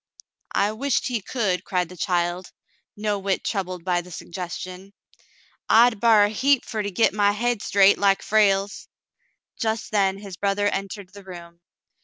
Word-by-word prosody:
"I 205 +1 +2
wisht 265 +4 -1
he 235 -3 -2
could," 190 -5 -1
cried 180 -3 -1
the 180 - -11
child, 175 0 -1 0.5
no 210 -1 -1
whit 195 -1 -1
troubled 185 -4 -3
by 175 -1 +1
the 180 - -14
suggestion. 180 +2 -7 0.4
" - - -31 0.3
I'd 230 -1 +5
bar 220 -2 +5
a 205 - +2
heap 265 +5 +2
fer 220 -2 -3
to 205 - -3
git 200 +3 +2
my 205 -1 +2
hade 240 0 -1
straight 200 -1 +4
like 195 -1 +2
Frale's." 200 -1 +1 0.7
Just 220 0 -2
then 195 -2 +2
his 195 -3 -9
brother 200 +1 0
entered 195 -1 -5
the 200 0 -12
room. 170 -2 -11
200 Hz, 165 wpm, -23 LUFS, 185-215 Hz, 0.7 s, I'd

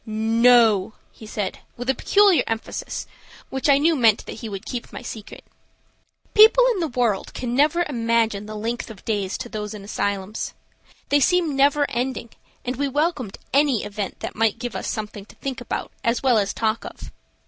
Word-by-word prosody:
"No," 225 -1 +4 0.2
he 220 - -13
said, 205 -3 -3 0.2
with 245 +1 -6
a 265 - +3
peculiar 390 - +4
emphasis, 225 0 -4 0.5
which 265 +2 -1
I 275 - +7
knew 320 +3 +3
meant 225 -6 +3
that - - -8
he 225 - -5
would 195 -2 -7
keep 245 -2 -5
my - - -8
secret. 220 -3 -8 0.9
People 445 +4 +7
in 400 - -4
the 330 - 0
world 240 -7 -1
can 245 -2 -3
never 305 +6 +3
imagine 230 -5 0
the 215 - -7
length 230 +4 -3
of 215 -4 -12
days 200 -4 -1
to - - -6
those 210 0 -5
in 205 - -9
asylums. 200 0 -3 0.5
They 290 - +4
seemed 335 +1 +2
never 285 +1 +4
ending, 245 -2 -3 0.3
and 250 0 -3
we 285 +1 0
welcomed 285 - -1 0.2
any 275 -5 +3
event 205 -1 -5
that - - -4
might 225 0 +2
give 245 0 -5
us - - -4
something 210 -3 -5
to - - -16
think 265 -2 -5
about 245 - -4
as 230 +3 0
well 250 -4 +4
as 200 -1 0
talk 220 0 -1
of. - - -9
235 Hz, 185 wpm, -23 LUFS, 215-275 Hz, 0.9 s, I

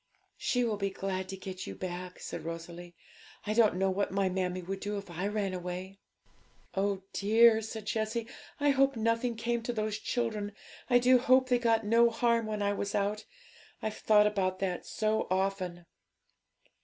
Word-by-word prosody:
'She 245 -1 0
will 220 -3 0
be 200 -1 -1
glad 190 -1 -4
to 190 - -5
get 185 -1 -7
you - - -6
back,' 180 0 -6
said - - -6
Rosalie. 170 +1 -7 0.5
'I 210 - 0
don't 220 -4 +4
know 190 +1 +1
what 200 +2 0
my 195 0 +1
mammie 185 -1 -2
would 190 +2 -4
do 205 +1 -3
if 200 -3 -7
I 180 +4 -2
ran 205 -2 -1
away.' 185 +2 -6 0.7
'Oh 195 0 0
dear!' 220 +2 +5
said 220 -1 -6
Jessie; 220 +2 -1 0.3
'I 290 0 +3
hope 275 0 +3
nothing 230 +1 0
came 235 +1 -1
to 235 - -3
those 215 -1 -2
children; 215 -4 -2 0.4
I 245 - +6
do 250 +1 +5
hope 255 +1 +4
they 245 -1 +3
got 225 -2 +2
no 230 +2 +5
harm 230 -1 +1
when 210 -1 -2
I 200 0 +1
was 200 0 -3
out! 205 +1 -1 0.6
I've 215 -1 -3
thought 210 -1 +5
about 190 -3 0
that 185 -2 -3
so 215 0 0
often.' 185 -2 -1
205 Hz, 180 wpm, -31 LUFS, 190-230 Hz, 0.7 s, I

